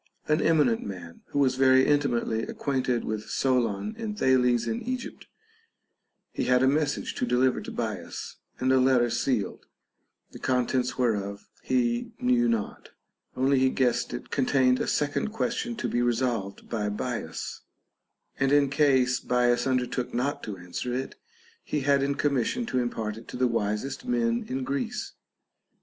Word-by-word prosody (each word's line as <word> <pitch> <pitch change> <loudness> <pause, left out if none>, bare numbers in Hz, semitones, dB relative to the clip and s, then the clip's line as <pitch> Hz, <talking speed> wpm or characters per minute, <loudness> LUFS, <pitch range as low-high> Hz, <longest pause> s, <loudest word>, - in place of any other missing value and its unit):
an 150 +1 +3
emi 160 -2 +4
nent 115 -3 +1
man, 90 -4 -8
who - - -5
was 135 -2 +3
very 130 0 +5
intimately 130 -6 +1
acquainted 130 -2 -1
with 110 -1 -4
Solon 125 - 0
and 215 -2 -4
Thales 125 - +3
in 115 -1 -2
Egypt; 255 +1 -5 1.0
he - - -2
had 125 0 +3
a - - +5
message 145 +1 0
to - - -1
deliver 125 +1 +2
to - - -7
Bias, - - -5 0.2
and 130 +1 +2
a 130 - +5
letter 125 -2 +3
sealed, 115 -3 -1 0.6
the - - -10
contents 125 0 0
whereof 100 -5 -1
he 120 -2 0
knew 120 -1 +3
not; 115 -3 -3 0.5
only 135 +1 +3
he 130 0 +4
guessed 125 -2 +1
it - - -7
contained 130 -2 +3
a - - -1
second 145 +7 0
question 235 +2 -2
to 210 - -3
be 120 - 0
resolved 120 -5 -1
by 105 -3 -2
Bias, 105 -5 -4 0.8
and 135 0 +2
in 145 -1 +4
case 130 -4 +3
Bias 125 0 +2
undertook 125 -1 -1
not 140 +4 -1
to 105 - -5
an 90 -1 -13
swer 125 +7 -2
it, 130 +1 -4 0.5
he 150 - -2
had 140 0 +3
in 140 +1 0
commission 145 - 0
to 130 - -1
impart 110 -3 -2
it 115 - -12
to - - -7
the 130 - +2
wisest 115 - -2
men 235 -1 +1
in 130 0 -2
Greece. 135 +1 -3
125 Hz, 160 wpm, -27 LUFS, 120-140 Hz, 1.0 s, very